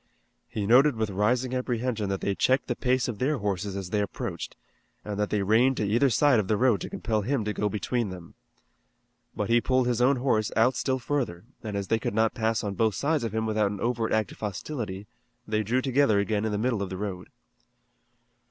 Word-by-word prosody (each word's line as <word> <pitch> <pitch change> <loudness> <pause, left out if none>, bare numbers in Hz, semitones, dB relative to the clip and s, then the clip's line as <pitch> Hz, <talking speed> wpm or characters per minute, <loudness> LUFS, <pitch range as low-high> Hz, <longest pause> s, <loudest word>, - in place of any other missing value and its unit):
He 105 - -3
noted 130 +5 +5
with 110 -2 -2
rising 120 +6 +1
apprehension 120 -4 -1
that 95 -1 -2
they 100 - 0
checked 130 +8 +2
the 120 - -2
pace 125 +1 +1
of 120 -5 -5
their 140 +3 +1
horses 100 -2 -2
as 95 -2 -5
they 105 - +1
approached, 100 - -5 0.5
and 105 -1 -4
that 105 - 0
they 105 -2 0
reined 120 +6 +3
to 105 - 0
either 120 +7 +3
side 135 -1 +4
of 100 - -1
the 105 - +1
road 120 -4 +3
to - - -5
compel 110 -1 -1
him 120 +1 -1
to 105 - -1
go 105 0 -1
between 110 +2 -1
them. 90 -2 -10 1.0
But 105 +2 -2
he 120 0 +5
pulled 130 0 +2
his 120 -1 0
own 135 +3 +4
horse 120 -5 0
out 120 +3 +3
still 130 +1 0
further, 125 -9 -2 0.2
and 105 -2 -4
as 100 -1 -4
they 115 - +2
could 105 - -3
not 110 0 +2
pass 110 -2 0
on 100 -1 -2
both 110 0 +1
sides 150 -2 0
of 110 -2 -3
him 110 0 0
without 110 -2 +1
an 100 -1 -5
overt 115 -1 -1
act 110 -2 +1
of - - -13
hostility 105 -1 -5 0.4
they 110 0 0
drew 120 +5 0
together 135 -5 +3
again 105 +1 0
in 110 - -1
the 105 - -1
middle 115 -1 0
of 100 - -3
the 95 - -5
road. 95 -3 -5
110 Hz, 225 wpm, -27 LUFS, 105-125 Hz, 1.0 s, noted